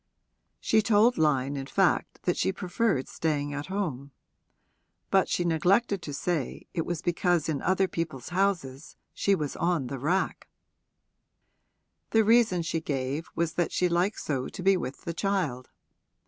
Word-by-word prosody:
She 220 - +3
told 220 0 +3
Lyon 140 -3 +2
in 135 -1 -5
fact - - +1
that - - +1
she 95 - +1
preferred 180 - -1
staying 145 -3 -2
at 145 0 -5
home; 160 -9 -3 1.0
but 195 -1 +3
she 175 - 0
neglected 185 +5 +2
to 150 - -6
say 150 -1 -2
it 165 -2 -2
was 175 -1 -3
because 175 -1 +1
in 150 -4 -1
other 190 +1 +2
people's 155 -8 -4
houses 175 -7 -1 0.2
she 200 - +2
was 150 -5 -3
on 170 -5 0
the 135 +1 -5
rack: 175 +8 -1 1.6
the 225 0 +4
reason 220 -6 +4
she 165 0 -2
gave 140 +1 -3
was 165 -1 0
that 175 0 0
she 180 - +2
liked 175 +4 0
so 135 -4 -2
to 185 - -8
be 195 +1 +5
with 140 -7 -4
the 170 - -4
child. 165 -11 -1
170 Hz, 155 wpm, -28 LUFS, 145-190 Hz, 1.6 s, be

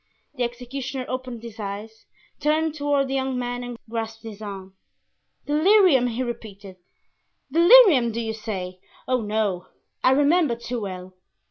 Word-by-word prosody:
The 265 - -7
executioner 255 +2 -4
opened 255 -3 -5
his 230 -1 -10
eyes, 210 +2 -7 0.3
turned 310 +1 +1
toward 285 -2 0
the 265 - -4
young 265 -1 -1
man 245 0 -3
and 245 -1 -7
grasped 225 0 -5
his 220 -2 -9
arm. 195 -2 -8 0.7
"'Delirium,'" 310 - +4
he 245 +2 -2
repeated; 205 -5 -8 0.7
"'delirium,' 335 - +7
do 230 - -4
you 225 -1 -3
say? 190 -5 -6 0.3
Oh, 255 -1 +1
no! 210 -4 -1 0.4
I - - +6
remember 290 -1 +3
too 235 +1 -5
well. 185 -2 -7
240 Hz, 140 wpm, -24 LUFS, 220-275 Hz, 0.7 s, delirium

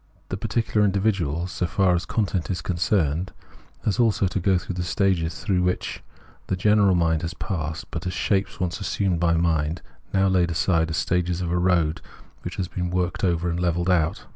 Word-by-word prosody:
The - - -2
particular 110 0 0
individual, 95 -5 +1
so 90 0 -2
far 95 +1 +2
as 85 0 -1
content 95 -5 -1
is 90 - -2
concerned, 90 -1 0 0.5
has 105 +3 0
also 110 -4 +3
to 95 +1 -1
go 95 +1 +3
through 90 - -5
the 90 - -3
stages 90 -2 0
through 95 -4 +1
which 90 0 -1 0.5
the 95 - 0
general 100 0 +4
mind 80 -2 +2
has 85 +2 -4
passed, 80 -5 -4
but 85 +2 -4
as 90 - -2
shapes 95 +1 0
once 90 +2 -2
assumed 95 -3 0
by 85 -1 +3
mind 80 -1 0 0.3
and 95 0 +2
now - - +4
laid 90 -2 +2
aside, 80 0 +1
as 80 - -2
stages 90 +1 0
of 85 -2 -2
a 90 - +1
road 85 -3 +2 0.4
which - - -6
has 95 - -2
been 90 +1 -3
worked 90 +1 -1
over 85 -2 +1
and 85 0 -1
levelled 85 +1 +1
out. 80 -3 +1
90 Hz, 195 wpm, -24 LUFS, 85-95 Hz, 0.5 s, general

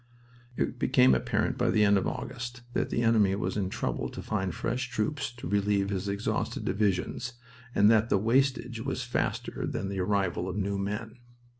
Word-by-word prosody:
It - - -1
became 65 +1 +5
apparent 65 - 0
by - - +2
the 105 -1 +4
end 100 0 +5
of 95 - +1
August 120 -1 -5
that - - 0
the 120 - 0
enemy 110 -4 +4
was 100 - -2
in 100 -3 -1
trouble - - -2
to - - -8
find 95 -4 -1
fresh 125 +8 -2
troops 125 +4 -1
to 120 -7 -7
relieve 100 0 +1
his 95 0 -2
exhausted 100 +1 -2
divisions, 105 +4 0 0.4
and 105 - +6
that 110 0 +3
the - - +4
wastage 125 +2 +1
was 130 +1 -3
faster 120 - -2
than 95 - -3
the 100 -1 -3
arrival 95 -1 0
of 95 - -4
new 100 0 -1
men. 105 +4 -4
105 Hz, 180 wpm, -29 LUFS, 100-120 Hz, 0.4 s, and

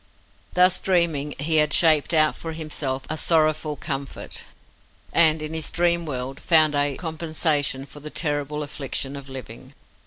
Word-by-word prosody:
Thus 180 0 +5
dreaming, 165 -6 0
he 155 +3 0
had 150 -1 +3
shaped 155 -4 +5
out 155 -2 +3
for 165 -1 -7
himself 145 -4 -3
a 155 - -2
sorrowful 155 -2 +1
comfort, 140 -2 -5 0.7
and 160 -2 +4
in 155 +1 -5
his 160 -2 -3
dream 170 -1 +1
world 130 -1 -4
found 155 -3 +4
a 145 -1 0
compensation 155 -4 -1
for 145 - -12
the 150 +1 -8
terrible 150 -1 -1
affliction 140 -1 -4
of 140 -1 -9
living. 130 -3 -10
155 Hz, 150 wpm, -23 LUFS, 145-160 Hz, 0.7 s, Thus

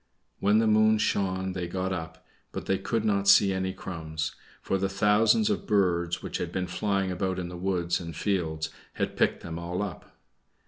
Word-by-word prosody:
When 105 +2 +4
the 110 - +4
moon 110 0 +5
shone 95 -3 0
they 90 -2 -3
got 95 +1 -2
up, 80 -2 -7 0.3
but - - -5
they 95 - +1
could 110 +3 -1
not 100 -2 +1
see 100 0 +7
any 95 0 -1
crumbs, 80 -4 -5 0.3
for 95 - -1
the 95 0 0
thousands 105 - +3
of 210 - -2
birds 85 -4 +1
which - - -4
had - - -3
been 95 - -1
flying 95 +1 -1
about 95 0 -1
in 90 -1 -4
the 90 - -7
woods 90 -1 0
and 85 -2 -7
fields 80 -6 -1 0.2
had - - -2
picked - - +1
them 80 0 -5
all 90 +3 -3
up. 95 -7 -8
95 Hz, 190 wpm, -28 LUFS, 85-100 Hz, 0.3 s, see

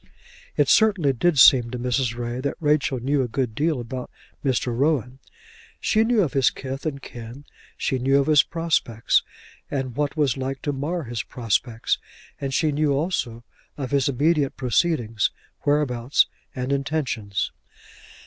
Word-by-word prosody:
It - - +4
certainly 195 -11 +4
did 160 +5 +1
seem 125 -2 +7
to 125 - -4
Mrs. 125 -1 0
Ray 120 +1 -3
that 140 +1 -2
Rachel 150 -4 +1
knew 135 +3 +1
a 125 - 0
good 120 -1 -2
deal 150 +2 0
about 125 +1 -6 0.3
Mr. 125 -3 0
Rowan. 130 -2 0 0.6
She 220 0 +2
knew 225 -2 +3
of 150 - -2
his 135 -3 +4
kith 135 +3 -6
and 140 -3 -3
kin, 120 +4 -9 0.3
she 130 - -1
knew 135 +2 +3
of 140 - +1
his 150 -2 +6
prospects 155 -9 +1 0.5
and 130 -4 -3
what 145 +2 -1
was 140 -5 +2
like 135 0 -4
to 145 - -1
mar 155 +5 -2
his 120 -2 -3
prospects, 115 0 -1 0.4
and 135 -1 -3
she 155 +3 +1
knew 145 0 +1
also 135 -7 -2 0.3
of 135 -2 -4
his 140 -1 +2
immediate 145 +1 +1
proceedings, 120 - +1 0.4
whereabouts, 140 -3 +2 0.3
and 130 +1 -2
intentions. 135 - -2
135 Hz, 155 wpm, -24 LUFS, 125-150 Hz, 0.6 s, seem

